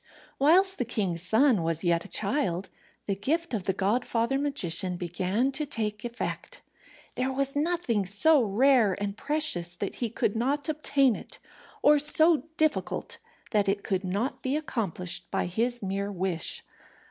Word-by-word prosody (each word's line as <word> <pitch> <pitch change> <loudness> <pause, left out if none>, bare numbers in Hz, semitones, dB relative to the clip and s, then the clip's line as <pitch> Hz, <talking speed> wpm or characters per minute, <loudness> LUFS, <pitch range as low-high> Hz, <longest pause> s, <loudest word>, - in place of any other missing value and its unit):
Whilst 375 +7 +4
the - - +2
king's 195 -8 -2
son 220 +3 +3
was 165 0 -1
yet 170 -1 +1
a - - -11
child, 195 - -1 0.3
the 200 - -1
gift 310 - -2
of 205 -5 -2
the - - +2
godfather 230 +6 0
magician 185 - 0
began 185 +9 -1
to 300 +3 -2
take 210 -6 -3
effect. 240 - -6 0.5
There 255 +1 -1
was 275 +1 -2
nothing 290 - 0
so 280 - +5
rare 230 -1 +3
and 200 0 -3
precious 220 - 0
that 200 +2 -5
he 235 - -2
could 215 -1 -1
not 275 +5 -1
obtain 280 -5 +2
it, - - -10 0.5
or 295 0 +6
so 310 0 +5
difficult 310 -2 -1 0.3
that 205 -3 +2
it 200 0 -1
could 190 0 -2
not 200 +8 -3
be 265 +2 -1
accomplished 200 - -3
by - - -1
his 230 +6 -2
mere 195 +1 -3
wish. 185 -3 0
225 Hz, 155 wpm, -27 LUFS, 190-280 Hz, 0.5 s, or